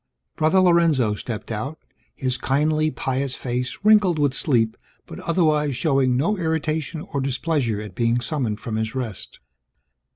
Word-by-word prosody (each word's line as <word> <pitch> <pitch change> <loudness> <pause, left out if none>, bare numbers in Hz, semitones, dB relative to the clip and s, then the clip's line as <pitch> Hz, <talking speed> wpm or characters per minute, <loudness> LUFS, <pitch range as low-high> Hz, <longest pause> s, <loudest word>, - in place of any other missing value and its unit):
Brother 160 +4 +3
Lorenzo 165 - +3
stepped 110 0 -6
out, 135 +8 -4 0.4
his 130 -2 -1
kindly 155 +4 +1
pious 130 -1 -2
face 125 0 -3
wrinkled 210 -5 +5
with 145 -3 +2
sleep 115 -6 +1 0.3
but - - -9
otherwise 155 -5 +1
showing 135 -5 +2
no 175 +10 +1
irritation 160 -1 -2
or 140 - 0
displeasure 135 -4 -1
at 105 -3 -8
being 115 +3 +1
summoned 120 -5 -2
from 115 -4 -4
his 110 +2 -2
rest. 120 -7 -5
135 Hz, 140 wpm, -23 LUFS, 120-155 Hz, 0.4 s, wrinkled